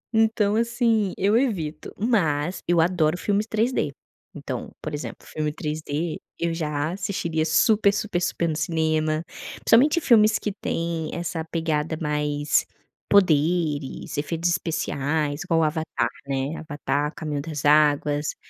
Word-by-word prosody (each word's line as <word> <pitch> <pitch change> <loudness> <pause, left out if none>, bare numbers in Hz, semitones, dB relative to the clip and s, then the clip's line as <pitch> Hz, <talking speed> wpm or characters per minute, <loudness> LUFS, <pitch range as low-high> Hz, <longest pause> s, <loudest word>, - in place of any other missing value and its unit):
Então, 220 -2 +3
assim, 230 -3 +1
eu 200 +3 +2
evito 175 - -1
mas 180 -7 +1
eu 175 -1 +3
adoro 165 -1 +2
filmes 205 +3 0
3D, 220 - 0 0.4
então, - - -5
por - - -6
exemplo 145 - -6
filme 155 -1 -3
3D 155 +1 -3 0.2
eu 170 0 0
já 150 -1 -2
assistiria 175 -4 -2
super 205 +5 +4
super 200 -3 -2
super 170 - 0
no 155 - -1
cinema, 155 0 0 0.3
principalmente 285 +8 +4
filmes 220 -6 +5
que 210 - -3
têm 165 -4 -3
essa 170 -1 -3
pegada 160 -1 -1
mais 150 -1 0 0.5
poderes, 160 -6 +2
efeitos 165 +4 -1
especiais, 155 -3 -1
igual 165 -1 +2
o - - +3
Avatar, 155 -6 -1 0.2
né, 135 +3 -2
Avatar 145 -1 -2
Caminho 150 -3 -3
das 150 -2 -5
Águas, 150 0 +3
160 Hz, 130 wpm, -24 LUFS, 150-195 Hz, 0.5 s, filmes